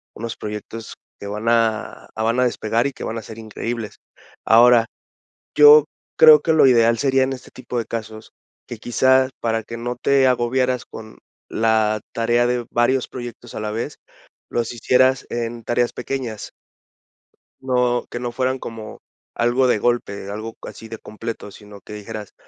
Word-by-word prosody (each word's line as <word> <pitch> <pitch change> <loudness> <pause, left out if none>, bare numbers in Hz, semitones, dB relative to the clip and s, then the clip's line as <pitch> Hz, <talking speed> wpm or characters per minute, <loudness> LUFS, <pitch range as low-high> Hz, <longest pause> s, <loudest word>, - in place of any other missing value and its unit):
unos 115 +1 -5
proyectos 105 +1 -7 0.2
que 100 - -7
van 105 +2 -5
a 115 -1 0
van 115 +2 0
a 125 - +4
despegar 115 +1 0
y - - -4
que - - -9
van 115 - -4
a - - -4
ser 110 +1 -11
increíbles, 115 0 -6 0.5
ahora, 115 0 +6 0.7
yo 150 0 +8 0.3
creo 155 -2 +8
que 165 - 0
lo 155 -4 +6
ideal 115 -2 +4
sería 135 +1 +2
en 135 - -1
este 130 - -10
tipo 125 -1 -7
de 115 - -3
casos, 110 -1 -7 0.4
que 120 - -7
quizá 130 +3 +2
para 115 -1 -1
que 115 +2 -8
no 120 +1 -4
te 135 +2 +3
agobiaras 125 0 0
con 110 -1 -11 0.3
la 110 -1 +1
tarea 120 +1 +1
de 120 -1 -1
varios 125 +2 +1
proyectos 120 -1 -9
a - - -4
la 105 0 -3
vez, 115 +7 -4 0.5
los 120 0 -2
hicieras 130 +3 +2
en 120 0 -4
tareas 120 +1 0
pequeñas 125 -6 -5 1.1
no 125 -2 0
que 120 - -4
no 120 -1 -4
fueran 130 +1 -1
como 110 -3 -8 0.3
algo 120 +2 +2
de 110 - +2
golpe, 100 -5 -1
algo 110 +2 -6
así 115 - -9
de 115 - -7
completo, 110 0 -7
sino 105 0 -14
que - - -11
dijeras: 105 0 -8
115 Hz, 165 wpm, -21 LUFS, 110-125 Hz, 1.1 s, yo